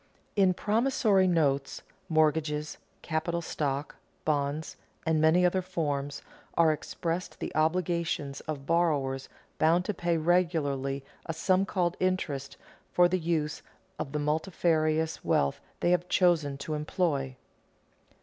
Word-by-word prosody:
In 190 -2 +4
promissory 215 -3 +2
notes, 145 -6 +1 0.3
mortgages, 155 -1 +1 0.2
capital 170 +1 -1
stock, 145 -2 -3 0.3
bonds, 150 +1 -1 0.3
and 160 -1 +2
many 165 +3 +5
other 185 +1 +2
forms, 145 -6 -3 0.3
are 165 -2 +6
expressed 165 +2 -4
the - - -4
obligations 160 -3 0
of 145 -3 -4
borrowers 145 -6 +1 0.3
bound 170 +3 +3
to 210 - -1
pay 170 -2 0
regularly 150 -5 +1 0.2
a 165 - -2
sum 185 +4 +2
called 175 -2 0
interest 175 -7 -1 0.3
for 175 0 +5
the 185 +1 0
use 160 -3 -1 0.4
of 135 - -4
the 150 - -2
multifarious 160 0 0
wealth 70 0 +1 0.2
they 175 - +3
have 180 0 +1
chosen 160 -6 +3
to 155 +3 -5
employ. 150 -3 -1
160 Hz, 120 wpm, -29 LUFS, 145-175 Hz, 0.4 s, are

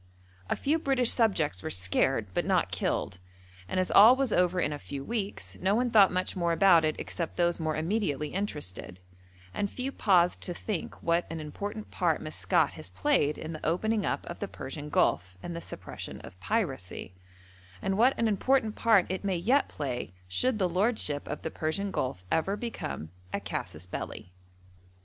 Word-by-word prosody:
A - - +2
few 310 +4 +1
British 265 -5 +2
subjects 170 - +2
were - - -4
scared, 95 +7 +2
but - - +1
not - - +1
killed, 90 - -1 0.5
and 185 - -1
as 185 - +1
all 220 +5 +9
was 265 -4 0
over 180 0 +3
in 150 - 0
a 145 - -5
few 140 -1 -6
weeks 210 +1 -4
no 195 +2 +2
one 245 +1 +1
thought 205 -4 +7
much 185 0 -1
more 170 -2 +1
about 175 -2 +6
it 155 0 +1
except 170 -2 -4
those 175 0 +2
more 155 -1 -1
immediately 155 -4 -1
interested, 145 - -4 0.5
and 205 - -1
few 260 +5 -4
paused 180 -8 +3
to 175 - -4
think 200 -3 -4
what 170 +1 +1
an 165 - -5
important 205 +8 -6
part - - +1
Maskat - - +1
has - - -7
played 265 - +1
in 160 +1 -6
the 155 - -8
opening 210 +6 +1
up - - -1
of 170 - -7
the 200 - -3
Persian 145 0 -7
Gulf 90 - +1
and 175 - -5
the 170 - -5
suppression - - -7
of 90 - -12
piracy, 135 - -2 0.7
and 190 - -1
what 245 +6 +4
an 230 - +2
important 220 +1 +2
part 220 -5 +4
it 190 +2 -3
may 195 -3 0
yet 245 +11 +2
play 125 - -4
should 220 - +1
the 190 -3 +2
lordship 180 -5 0
of 150 - -5
the 160 - -3
Persian 195 +6 -2
Gulf 125 - -2
ever 195 +5 +1
become 80 - -5 0.2
a - - -1
casus 80 +4 -5
belli. 90 0 -6
180 Hz, 180 wpm, -29 LUFS, 150-215 Hz, 0.7 s, all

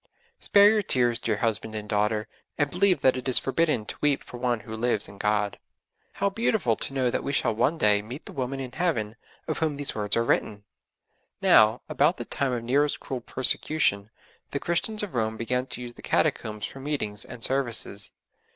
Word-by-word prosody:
'Spare 200 0 +6
your 215 -1 +2
tears, 120 - +1
dear 110 -3 -1
husband 110 -1 -1
and 105 -1 -5
daughter, 105 +1 0 0.3
and 145 -2 0
believe 180 -4 +2
that 130 - +4
it 130 0 -5
is 130 - +4
forbidden 135 -5 +1
to - - -8
weep 145 -2 +1
for 125 - -10
one 120 -2 -1
who 110 +1 -8
lives 110 -2 -1
in 100 - -14
God.' 105 -1 0 0.5
How 200 0 0
beautiful 200 - +1
to - - -4
know 130 -2 +1
that - - -2
we - - -2
shall 140 - +1
one 125 +9 +1
day 105 -6 +3
meet 120 +7 -9
the - - -8
woman 135 0 -3
in 130 -2 -5
Heaven 125 -10 -1 0.3
of 155 - -2
whom 155 -3 0
these 140 0 -4
words 105 0 0
are 115 - +2
written! 105 -3 0 0.8
Now, 110 +3 +5
about 155 +6 +2
the - - -5
time 140 -2 -1
of 120 -2 -3
Nero's 140 +5 +1
cruel 130 -2 -6
persecution, 125 -5 +3 0.4
the 140 - -3
Christians 210 +7 -1
of 205 - -5
Rome 110 -2 -1
began 125 +3 -1
to 125 - -8
use 120 -1 -7
the - - -14
Catacombs 105 -1 0
for 135 - -9
meetings 135 -8 -3
and 115 - -10
services. 120 -6 -1
125 Hz, 200 wpm, -26 LUFS, 110-145 Hz, 0.8 s, Spare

